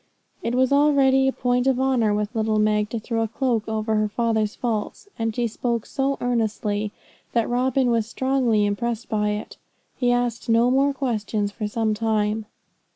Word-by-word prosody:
It 235 - -2
was 260 +1 +2
already 275 -2 +4
a - - +3
point 250 0 0
of 260 -1 +2
honour 255 -5 +2
with 210 +2 -1
little 220 -1 +1
Meg 210 0 +2
to 230 - -3
throw 225 +1 -2
a 225 - 0
cloak 235 -1 -1
over 220 0 -1
her 215 0 +2
father's 220 -1 0
faults; 230 - -3
and 225 -1 -1
she 240 - 0
spoke 235 0 -2
so 275 0 -1
earnestly 215 -3 -1 0.4
that 230 -2 +2
Robin 255 +1 +1
was 225 -2 +1
strongly 250 -4 +1
impressed 225 +3 -2
by 210 -2 0
it. 210 0 -5 0.4
He 245 -2 +2
asked 245 -1 -1
no 230 +2 +4
more 275 +2 +3
questions 220 -6 -2
for 210 +1 -4
some 220 0 0
time. 215 -1 0
230 Hz, 175 wpm, -23 LUFS, 215-250 Hz, 0.4 s, already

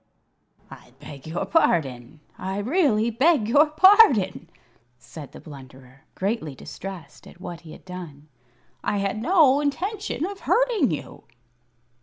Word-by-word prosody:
"I 120 - -14
beg 145 -1 -11
your 165 +2 -3
pardon! 145 - 0
I 190 +1 -5
really 235 - +1
beg 260 0 +2
your 290 +6 +4
pardon!" 300 - +4 0.5
said 145 +3 -12
the - - -12
Blunderer, 130 -3 -14
greatly 190 - -3
distressed 180 0 -10
at - - -16
what 175 -2 -8
he 160 - -13
had - - -15
done. 170 -6 -10 0.6
"I 205 - -1
had 200 +2 -2
no 295 -2 +4
intention 370 +4 -3
of 395 +1 -7
hurting 470 - +1
you." 155 - -7
200 Hz, 130 wpm, -24 LUFS, -, 0.6 s, your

